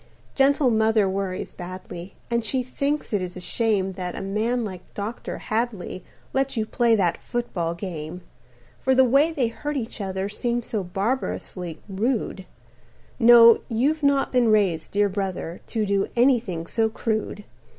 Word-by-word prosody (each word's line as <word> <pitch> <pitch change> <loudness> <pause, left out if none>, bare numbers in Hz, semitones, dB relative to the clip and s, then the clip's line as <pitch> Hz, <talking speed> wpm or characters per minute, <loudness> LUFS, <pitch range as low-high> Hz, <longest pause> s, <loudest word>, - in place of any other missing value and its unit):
"Gentle 275 -1 +3
mother 220 -2 +3
worries 190 -1 -3
badly, 180 0 -8 0.2
And 235 -1 +1
she 255 +4 +1
thinks 280 +2 -2
it 205 - +1
is 180 0 -5
a - - -5
shame 200 0 0
That 180 -1 -5
a - - -4
man 220 +5 0
like 185 -3 -9
Dr. 210 +3 -5
Hadley 215 -5 -3 0.3
Lets 270 -1 0
you 220 - +1
play 235 +1 +3
that 180 -5 +1
football 175 -9 -2
game. 170 -1 -6 0.6
"For 265 0 +2
the 260 - +7
way 275 +6 +4
they 260 -7 0
hurt 295 +5 -4
each 225 -3 -5
other 190 0 -2
Seems 240 +3 -2
so 215 -4 -2
barbarously 185 -3 -3
rude 205 -1 -2 0.7
No, 230 0 +8
you've 275 +7 +1
not 280 -1 +2
been 250 -2 +3
raised, 195 -7 +2
dear 205 0 +3
brother, 190 -3 -4
To 220 -2 -1
do 200 -1 +1
anything 235 -9 +2
so 225 +4 +1
crude. 220 -2 -2
215 Hz, 155 wpm, -24 LUFS, 190-240 Hz, 0.7 s, No